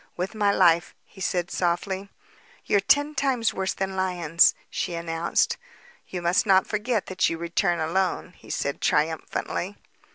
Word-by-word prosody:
"With 185 Hz, +4 st, -3 dB
my 205 Hz, -2 st, +2 dB
life," 170 Hz, -2 st, +3 dB
he 190 Hz, -, -15 dB
said 175 Hz, -1 st, -1 dB
softly. 190 Hz, +3 st, -1 dB, 0.6 s
"They're 205 Hz, -, +4 dB
ten 290 Hz, +9 st, +3 dB
times 255 Hz, -6 st, +1 dB
worse 190 Hz, 0 st, -2 dB
than 190 Hz, 0 st, -3 dB
lions," 175 Hz, -3 st, +3 dB, 0.2 s
she 175 Hz, -, -2 dB
announced. 170 Hz, 0 st, 0 dB, 0.5 s
"You 180 Hz, -2 st, -5 dB
must 175 Hz, +5 st, +2 dB
not 190 Hz, -1 st, +5 dB
forget 215 Hz, 0 st, -1 dB
that 185 Hz, 0 st, +1 dB
you 165 Hz, -, -3 dB
return 170 Hz, +1 st, 0 dB
alone," 180 Hz, +2 st, -1 dB
he -, -, -17 dB
said 140 Hz, -, -2 dB
triumphantly. 160 Hz, +5 st, -1 dB
185 Hz, 150 wpm, -25 LUFS, 170-200 Hz, 0.6 s, not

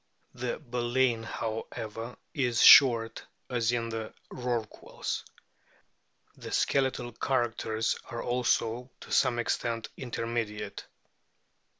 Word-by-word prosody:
The 125 Hz, -1 st, -3 dB
baleen, 120 Hz, -2 st, 0 dB
however, 115 Hz, +1 st, -5 dB, 0.2 s
is 125 Hz, -4 st, 0 dB
short 115 Hz, -4 st, +8 dB, 0.3 s
as 120 Hz, -2 st, +1 dB
in 115 Hz, -1 st, -1 dB
the 110 Hz, -1 st, -4 dB, 0.2 s
Rorquals. 120 Hz, -4 st, -3 dB, 1.1 s
The -, -, -9 dB
skeletal 130 Hz, -3 st, +1 dB
characters 115 Hz, -3 st, -1 dB
are 120 Hz, -, -5 dB
also 120 Hz, 0 st, 0 dB
to -, -, -11 dB
some 120 Hz, -, +3 dB
extent 115 Hz, -1 st, -1 dB
intermediate. 115 Hz, -3 st, -4 dB
120 Hz, 90 wpm, -29 LUFS, 115-125 Hz, 1.1 s, short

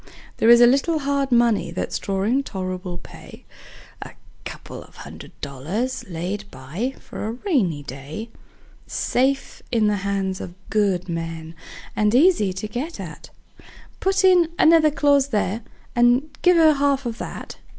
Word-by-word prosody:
There 225 Hz, -, +3 dB
is 235 Hz, 0 st, +8 dB
a -, -, +9 dB
little 275 Hz, +6 st, +3 dB
hard 280 Hz, -2 st, -1 dB
money 235 Hz, -3 st, +3 dB
that's -, -, -3 dB
drawin' 200 Hz, +7 st, 0 dB
tol'rable 185 Hz, -5 st, -5 dB
pay: -, -, -13 dB, 0.6 s
A -, -, -8 dB, 0.3 s
couple -, -, -8 dB
of -, -, -17 dB
hundred -, -, -11 dB
dollars 165 Hz, -, -3 dB
laid 185 Hz, +5 st, -4 dB
by 170 Hz, -, -5 dB
for -, -, -7 dB
a 220 Hz, -, -3 dB
rainy 235 Hz, -, 0 dB
day; 140 Hz, -, -8 dB, 0.6 s
Safe 270 Hz, +2 st, -1 dB
in 225 Hz, -3 st, +2 dB
the 210 Hz, -1 st, +2 dB
hands 195 Hz, -1 st, -2 dB
of 175 Hz, -, -8 dB, 0.2 s
good 200 Hz, -4 st, +1 dB
men, 165 Hz, -1 st, -5 dB, 0.4 s
and 210 Hz, +2 st, +2 dB
easy 280 Hz, -, +4 dB
to 190 Hz, +3 st, -5 dB
get 270 Hz, +10 st, -5 dB
at; -, -, -9 dB, 0.7 s
Put 385 Hz, 0 st, +1 dB
in 360 Hz, -3 st, +5 dB
another 320 Hz, -1 st, +6 dB
clause 285 Hz, -1 st, +3 dB
there, 215 Hz, -2 st, -1 dB, 0.3 s
and 245 Hz, +5 st, +3 dB
give 360 Hz, -1 st, +5 dB
her 320 Hz, -2 st, +6 dB
half 280 Hz, -1 st, +1 dB
of 235 Hz, -1 st, -4 dB
that. -, -, -7 dB
230 Hz, 150 wpm, -22 LUFS, 185-275 Hz, 0.7 s, a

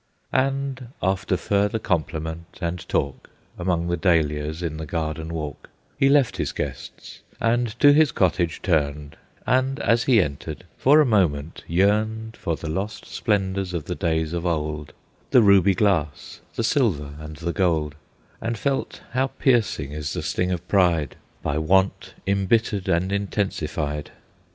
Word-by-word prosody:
And 135 Hz, -1 st, 0 dB, 0.2 s
after 95 Hz, 0 st, +1 dB
further 100 Hz, +4 st, +1 dB
compliment 80 Hz, -4 st, -3 dB
and 85 Hz, -1 st, -4 dB
talk, 70 Hz, -1 st, -2 dB, 0.3 s
Among 85 Hz, -1 st, 0 dB
the 85 Hz, 0 st, 0 dB
dahlias 80 Hz, -2 st, +1 dB
in 80 Hz, -2 st, -3 dB
the 80 Hz, -1 st, -6 dB
garden 80 Hz, 0 st, -3 dB
walk 75 Hz, -4 st, -6 dB, 0.3 s
He 135 Hz, -, +3 dB
left 140 Hz, -3 st, +3 dB
his -, -, -1 dB
guests; 70 Hz, -3 st, -6 dB, 0.2 s
and 120 Hz, 0 st, 0 dB
to 145 Hz, -1 st, +7 dB
his 150 Hz, -3 st, +5 dB
cottage 85 Hz, -3 st, 0 dB
turned, 75 Hz, -4 st, 0 dB, 0.3 s
And 130 Hz, +2 st, +1 dB
as 115 Hz, +1 st, +2 dB
he 125 Hz, -4 st, +5 dB
entered 75 Hz, -1 st, -3 dB
for 150 Hz, +4 st, +5 dB
a -, -, +4 dB
moment 85 Hz, -, +1 dB
yearned 110 Hz, +5 st, +1 dB
For 85 Hz, -, -2 dB
the 80 Hz, -, -7 dB
lost 95 Hz, +7 st, -3 dB
splendors 95 Hz, -4 st, -1 dB
of 80 Hz, -4 st, -3 dB
the 90 Hz, -, -3 dB
days 80 Hz, -3 st, -1 dB
of 85 Hz, -1 st, -2 dB
old, 75 Hz, -3 st, -2 dB, 0.4 s
The 125 Hz, -, +6 dB
ruby 100 Hz, -1 st, +5 dB
glass, 90 Hz, -8 st, 0 dB
the 115 Hz, -, -1 dB
silver 100 Hz, -, +1 dB
and 75 Hz, 0 st, -8 dB
the 85 Hz, +2 st, -3 dB
gold, 80 Hz, -6 st, +1 dB, 0.5 s
And 115 Hz, 0 st, -2 dB
felt 135 Hz, +5 st, -2 dB
how 130 Hz, +2 st, +1 dB
piercing 120 Hz, -, +1 dB
is 75 Hz, -1 st, -4 dB
the -, -, -3 dB
sting 90 Hz, 0 st, -1 dB
of 90 Hz, 0 st, -4 dB
pride, 85 Hz, -8 st, +2 dB, 0.3 s
By 75 Hz, +1 st, 0 dB
want 95 Hz, +5 st, +1 dB
embittered 100 Hz, 0 st, +1 dB
and 95 Hz, +2 st, +1 dB
intensified. 80 Hz, -7 st, -2 dB
90 Hz, 150 wpm, -24 LUFS, 80-110 Hz, 0.5 s, to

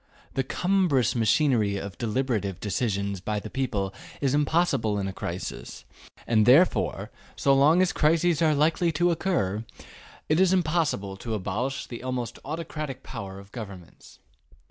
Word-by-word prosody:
The 135 Hz, -, 0 dB
cumbrous 165 Hz, -, +1 dB
machinery 115 Hz, -3 st, +2 dB
of 100 Hz, -2 st, -6 dB
deliberative 110 Hz, -5 st, -1 dB
decisions 100 Hz, -2 st, -2 dB
by 105 Hz, +2 st, -2 dB
the 105 Hz, -, -9 dB
people 105 Hz, -8 st, -2 dB, 0.3 s
is 135 Hz, -2 st, +1 dB
impossible 145 Hz, -8 st, +1 dB
in 100 Hz, -1 st, -2 dB
a 95 Hz, -, -4 dB
crisis, 90 Hz, 0 st, -6 dB, 0.4 s
and 110 Hz, -2 st, +3 dB
therefore 150 Hz, +9 st, +3 dB, 0.2 s
so 140 Hz, -, +3 dB
long 150 Hz, +7 st, +5 dB
as 185 Hz, -, 0 dB
crises 165 Hz, +1 st, +2 dB
are 155 Hz, -2 st, +4 dB
likely 165 Hz, +3 st, +2 dB
to 175 Hz, +3 st, +2 dB
occur, 155 Hz, -, -1 dB, 0.6 s
it 155 Hz, +2 st, +2 dB
is 190 Hz, -1 st, +4 dB
impossible 155 Hz, -, 0 dB
to 110 Hz, +2 st, -4 dB
abolish 110 Hz, +7 st, -3 dB
the 120 Hz, -, -8 dB
almost 125 Hz, -2 st, -4 dB
autocratic 155 Hz, -3 st, -5 dB
power 100 Hz, -6 st, -7 dB
of 100 Hz, +1 st, -13 dB
governments. 100 Hz, -7 st, -10 dB
130 Hz, 145 wpm, -26 LUFS, 100-155 Hz, 0.6 s, long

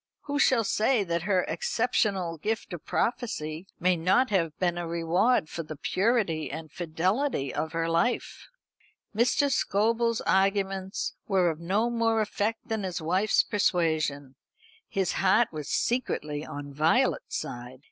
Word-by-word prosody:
Who 285 Hz, 0 st, -3 dB
shall 255 Hz, -4 st, +4 dB
say 220 Hz, +2 st, +2 dB
that 170 Hz, -2 st, -1 dB
her 185 Hz, -2 st, +3 dB
exceptional 190 Hz, -, 0 dB
gift 215 Hz, +2 st, -3 dB
of 170 Hz, -, -7 dB
prophecy 180 Hz, -8 st, -2 dB
may 180 Hz, +1 st, +3 dB
not 185 Hz, +9 st, +2 dB
have 165 Hz, -6 st, 0 dB
been 175 Hz, -2 st, 0 dB
a 170 Hz, -, -4 dB
reward 170 Hz, +5 st, +2 dB
for 165 Hz, -, -5 dB
the 155 Hz, -1 st, -7 dB
purity 190 Hz, -, 0 dB
and 155 Hz, +1 st, -7 dB
fidelity 175 Hz, -, -1 dB
of 155 Hz, +2 st, -3 dB
her 165 Hz, 0 st, 0 dB
life?" 170 Hz, +9 st, -1 dB, 0.7 s
Mr. 250 Hz, +5 st, +2 dB
Scobel's 230 Hz, +1 st, +1 dB
arguments 195 Hz, 0 st, 0 dB
were 185 Hz, -4 st, +3 dB
of 155 Hz, -, -8 dB
no 200 Hz, +8 st, 0 dB
more 230 Hz, -1 st, +1 dB
effect 215 Hz, +1 st, -2 dB
than 220 Hz, -1 st, -2 dB
his 185 Hz, -2 st, -3 dB
wife's 185 Hz, +6 st, +2 dB
persuasion. 160 Hz, -, 0 dB, 0.6 s
His 190 Hz, -2 st, 0 dB
heart 205 Hz, +5 st, +3 dB
was 150 Hz, -3 st, -6 dB
secretly 150 Hz, -12 st, -1 dB
on 145 Hz, -2 st, -7 dB
Violet's 155 Hz, +3 st, +1 dB
side. 125 Hz, +1 st, -7 dB
185 Hz, 140 wpm, -27 LUFS, 160-220 Hz, 0.7 s, shall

